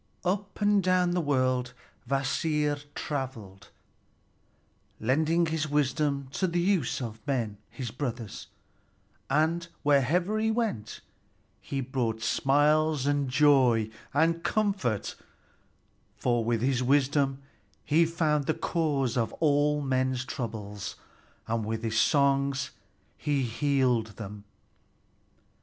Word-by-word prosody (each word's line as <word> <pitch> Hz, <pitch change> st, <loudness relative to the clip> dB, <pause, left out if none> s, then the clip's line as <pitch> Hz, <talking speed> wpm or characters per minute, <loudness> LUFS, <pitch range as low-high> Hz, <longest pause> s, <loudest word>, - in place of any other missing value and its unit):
Up 195 Hz, +2 st, -2 dB
and 205 Hz, -1 st, +3 dB
down 185 Hz, -1 st, +2 dB
the 175 Hz, 0 st, +1 dB
world 130 Hz, -4 st, 0 dB, 0.4 s
Kvasir 145 Hz, +2 st, 0 dB
traveled, 120 Hz, -9 st, -5 dB, 1.3 s
lending 160 Hz, +8 st, +2 dB
his 160 Hz, -1 st, -1 dB
wisdom 140 Hz, -1 st, 0 dB
to 185 Hz, -, 0 dB
the 175 Hz, 0 st, 0 dB
use 180 Hz, -5 st, +1 dB
of 110 Hz, -2 st, -5 dB
men, 115 Hz, -7 st, -1 dB
his 125 Hz, -5 st, -6 dB
brothers; 120 Hz, -5 st, -5 dB, 0.8 s
and 160 Hz, +4 st, +1 dB, 0.2 s
wherever 160 Hz, -, +2 dB
he 220 Hz, 0 st, +1 dB
went 220 Hz, -, -2 dB, 0.6 s
he 135 Hz, -1 st, -3 dB
brought 120 Hz, -4 st, -2 dB
smiles 145 Hz, +4 st, +2 dB
and 145 Hz, -2 st, +1 dB
joy 125 Hz, -6 st, +4 dB, 0.2 s
and 165 Hz, +3 st, +2 dB
comfort, 195 Hz, -, 0 dB, 1.0 s
for 120 Hz, -2 st, +1 dB
with 115 Hz, 0 st, 0 dB
his 130 Hz, -1 st, +1 dB
wisdom 135 Hz, +1 st, +2 dB, 0.5 s
he 155 Hz, +3 st, +4 dB
found 155 Hz, -3 st, 0 dB
the 160 Hz, -, +1 dB
cause 150 Hz, -7 st, 0 dB
of 115 Hz, -3 st, 0 dB
all 150 Hz, -1 st, +2 dB
men's 130 Hz, -1 st, 0 dB
troubles, 105 Hz, -6 st, -5 dB, 0.5 s
and 115 Hz, 0 st, -1 dB
with 110 Hz, +1 st, -3 dB
his 110 Hz, -1 st, +2 dB
songs 140 Hz, -1 st, +2 dB, 0.5 s
he 145 Hz, -2 st, 0 dB
healed 125 Hz, -2 st, +1 dB
them. 105 Hz, -1 st, -8 dB
140 Hz, 110 wpm, -28 LUFS, 125-155 Hz, 1.3 s, joy